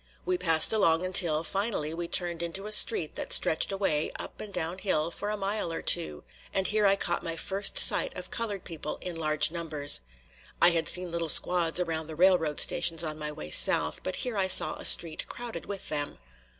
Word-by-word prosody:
We 365 - -1
passed 165 - +4
along 170 -5 0
until, 170 -4 +4
finally, 195 -6 -4
we 170 +1 -5
turned 170 -1 -1
into 170 +4 -6
a 210 - -8
street 210 -6 +2
that - - -6
stretched 160 - +2
away, 190 -6 -2
up - - -9
and 210 - -9
down 175 0 -5
hill, 170 -5 -2
for 205 +4 -7
a 210 - -4
mile 200 -2 -4
or 165 - -6
two; 75 -1 -1 0.3
and 190 -1 -3
here 210 0 0
I 195 - +2
caught - - -4
my 165 -1 -5
first 195 +4 0
sight - - +5
of 180 0 -9
colored 205 -5 -5
people 155 -2 -7
in 180 -2 -6
large 155 -1 +2
numbers. 155 - -1 0.6
I 175 - +5
had 165 -1 0
seen 180 -1 +1
little 170 -1 -3
squads 175 +1 +4
around 160 -3 -4
the 160 - -10
railroad 170 -3 +1
stations 165 -1 +2
on 155 -1 -7
my 150 0 -5
way 75 - -10
south, 75 0 +2
but 185 - -6
here 245 -4 -4
I 190 - -1
saw 185 - +7
a - - -7
street 160 -2 +3
crowded 240 -1 -7
with 200 -1 -8
them. 145 -1 -5
170 Hz, 205 wpm, -26 LUFS, 160-195 Hz, 0.6 s, saw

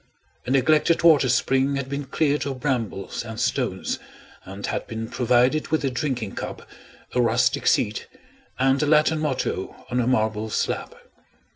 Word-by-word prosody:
A - - -2
neglected 155 +5 +3
water 150 -6 +6
spring 135 +2 +2
had 140 -1 -3
been 140 +1 -4
cleared 145 +1 0
of 135 -2 -4
brambles 120 -7 -2
and 110 -1 -7
stones, 125 -6 -1 0.5
and 100 +1 -7
had - - -3
been 115 0 -5
provided 125 +5 +2
with 155 -2 0
a 135 - 0
drinking 125 -6 -2
cup, - - -7 0.5
a 125 - +2
rustic 120 +3 +2
seat, 105 -3 +1 0.5
and 135 +2 +2
a 150 - +1
Latin 155 +1 +3
motto 135 -10 -3
on 125 - +1
a 120 - +1
marble 110 -3 0
slab. - - -2
130 Hz, 155 wpm, -24 LUFS, 115-140 Hz, 0.5 s, water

